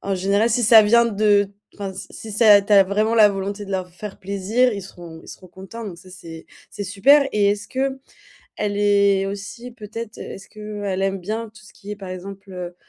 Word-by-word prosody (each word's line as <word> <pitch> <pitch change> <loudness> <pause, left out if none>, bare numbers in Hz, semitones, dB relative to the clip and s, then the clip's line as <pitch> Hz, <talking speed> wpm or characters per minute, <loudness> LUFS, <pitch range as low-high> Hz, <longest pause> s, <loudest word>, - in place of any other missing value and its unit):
général, 200 +5 +1
si 240 +2 +1
ça 220 0 +8
vient 235 +3 +4
de, 205 -2 +2 0.2
enfin, 195 -2 -6
si 190 - -9
si 220 - -9
c'est 215 +1 +3
à 205 -1 +9
ta - - -14
tu 210 - +3
as 200 -1 +8
vraiment 215 +3 +1
la 215 -2 +7
volonté 200 +1 -4
de 195 - -8
leur 185 -1 -3
faire 195 +3 -9
plaisir, 200 +6 0
ils 200 - -5
seront 170 -3 -11
ils - - -18
seront 185 - -12
contents, 190 +6 -10
donc 180 -4 -8
ça, 185 - -16
c'est 165 -3 -11 0.3
c'est 205 - -6
super 270 +10 +4
et 205 -1 +3
est-ce 205 0 -2
que, 265 0 -2 0.6
elle 205 -1 -2
est 200 -1 +3
aussi 200 +5 -7
peut-être 225 -1 -8
est-ce 195 - -9
que 210 -1 -8
elle 190 -1 -2
aime 195 0 -1
bien 215 +4 -5
tout 215 - -16
ce - - -16
qui 205 - -10
est, 210 - -4
par 195 -2 -9
exemple, 195 +2 -9
heu, 180 -1 -7
205 Hz, 230 wpm, -21 LUFS, 195-215 Hz, 0.6 s, à